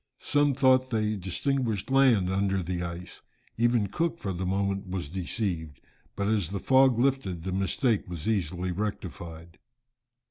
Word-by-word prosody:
Some 145 -2 +2
thought 130 -1 +4
they 110 -2 0
distinguished 110 +4 -2
land 130 -8 +4
under 95 -1 0
the 90 +1 -3
ice, 85 +1 -7 0.3
even 120 -2 +2
Cook 165 - -1
for 100 - -4
the 90 +1 -3
moment 100 +1 -1
was 90 -6 -4
deceived, 90 - -3 0.4
but 100 0 -1
as 105 -6 +1
the 100 - -3
fog 130 0 +4
lifted 120 -10 0
the 95 - -3
mistake 100 +3 0
was 85 -1 -5
easily 90 -4 -1
rectified. 85 -4 -6
100 Hz, 145 wpm, -28 LUFS, 90-120 Hz, 0.4 s, thought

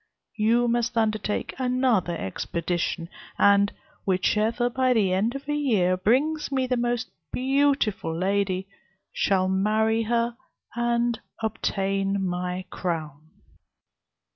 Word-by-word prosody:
You 230 +3 +3
must 240 0 0
undertake 215 -2 0
another 250 -9 +1
expedition; 170 - -2 0.3
and 200 0 +5 0.3
whichever, 215 +5 +1
by 255 +1 +2
the 200 -6 +2
end 215 +7 +1
of 275 0 -7
a 295 - 0
year, 215 -12 +2
brings 280 +11 +1
me 260 -1 +1
the 255 0 0
most 240 0 -1 0.2
beautiful 270 - +1
lady, 190 0 0 0.5
shall 190 -1 +2
marry 215 +4 +2
her, 235 +1 0 0.4
and 235 0 +1 0.2
obtain 195 -2 -1
my 180 0 -3
crown." 155 -3 -4
215 Hz, 110 wpm, -25 LUFS, 185-240 Hz, 0.5 s, and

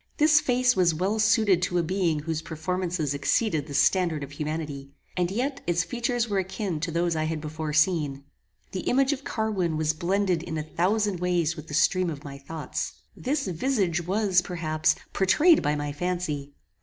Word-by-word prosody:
This 300 -1 +6
face 250 -3 +2
was 175 -3 +3
well 195 +6 0
suited 215 -4 +4
to 180 0 0
a 175 - +2
being 170 -3 0
whose 160 0 -3
performances 165 -1 -2
exceeded 155 - 0
the 140 - -6
standard 170 -5 +2
of 140 - -8
humanity, 150 -2 -4 0.3
and 180 -1 +1
yet 265 +8 -2
its 175 0 +2
features 240 +3 -1
were 200 -3 0
akin 190 -2 -3
to 165 +3 -2
those 170 0 0
I 155 0 0
had 160 0 -2
before 155 0 -4
seen. 150 -3 +1 0.5
The 190 - -3
image 270 +8 +2
of 280 0 -7
Carwin 195 - -1
was 155 0 +1
blended 180 +1 0
in 160 -2 -5
a 155 - -2
thousand 185 +4 0
ways 175 -2 +1
with 155 -1 -9
the 145 - -4
stream 180 +3 +3
of 145 -3 -6
my 140 -1 -8
thoughts. 155 +3 -5 0.2
This 275 +3 -1
visage 185 -2 0
was, 195 -2 +3
perhaps, 155 -3 0 0.2
pourtrayed 300 - +4
by 150 +1 +1
my 145 0 -3
fancy. 150 -3 -3
175 Hz, 180 wpm, -26 LUFS, 155-200 Hz, 0.5 s, This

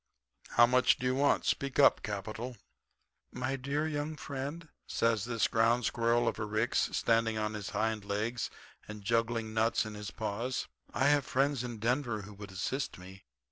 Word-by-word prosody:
How 120 - +9
much 125 +1 +4
do 130 - -5
you 125 - +2
want? 140 +2 +2
Speak 140 -1 -1
up. 145 - +6
Capital.' 110 +4 -5 0.8
"'My 130 +2 -2
dear 140 +4 -1
young 150 0 -2
friend,' 145 +4 -5 0.2
says 115 -3 +1
this 115 -2 +1
ground 115 +1 +2
squirrel 120 +1 +2
of - - -1
a 105 - -1
Ricks, 110 +3 +1
standing 115 -1 +2
on 105 0 -1
his 105 -2 -5
hind 110 0 -1
legs 105 +4 -2 0.4
and 105 -1 -8
juggling 115 0 0
nuts 110 +1 +2
in 110 - -6
his 105 0 -6
paws, 115 +4 -3 0.2
'I - - 0
have 145 -1 +4
friends 135 -1 +1
in 120 -2 -5
Denver 120 -1 0
who 105 +2 -10
would 100 0 -9
assist 130 +9 -3
me. 95 +1 -12
115 Hz, 175 wpm, -32 LUFS, 105-130 Hz, 0.8 s, How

